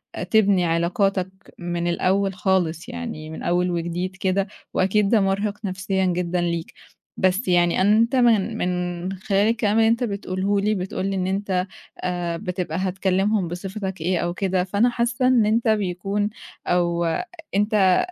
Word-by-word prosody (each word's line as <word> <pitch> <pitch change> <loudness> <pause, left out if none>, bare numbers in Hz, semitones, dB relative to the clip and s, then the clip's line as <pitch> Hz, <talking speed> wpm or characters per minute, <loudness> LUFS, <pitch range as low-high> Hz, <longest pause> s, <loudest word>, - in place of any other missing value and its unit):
آآ - - -4
تبني 200 -5 +3
علاقاتك 180 +3 +1 0.3
من 175 0 -2
الأول 190 +3 +1
خالص 185 +1 0
يعني 230 -11 -6
من 160 - -7
أول 180 +1 +1
وجديد 175 +2 -3
كده 190 +2 0 0.3
وأكيد 195 +2 +2
ده 225 -4 +4
مرهِق 200 +2 -1
نفسيًا 190 0 -1
جدًا 180 0 0
ليك، 170 -1 -2 0.5
بس 190 +5 +1
يعني 175 0 +3
أنت 220 +6 +3
من 230 -3 +3
من 180 0 -2
خلال 200 0 +1
الكلام 220 -2 +1
اللي 225 0 +5
أنت 230 +2 +2
بتقوله 200 -1 -1
لي، 210 +2 +1
بتقول 185 0 -3
لي 195 0 -1
إن 185 -1 -1
أنت 190 -1 -1 0.4
آآ 175 -2 -2
بتبقى 180 -4 -3
هتكلّمهم 190 +1 0
بصفتك 190 +1 -5
إيه 180 +1 +1
أو 175 0 -1
كده 185 -1 0
فأنا 205 +6 +2
حاسّة 240 +1 0
إن 245 -4 +4
أنت 225 +2 +1
بيكون 205 0 0 0.4
أو 170 -1 +1 0.5
أنت 205 -3 +3
190 Hz, 150 wpm, -23 LUFS, 180-205 Hz, 0.5 s, اللي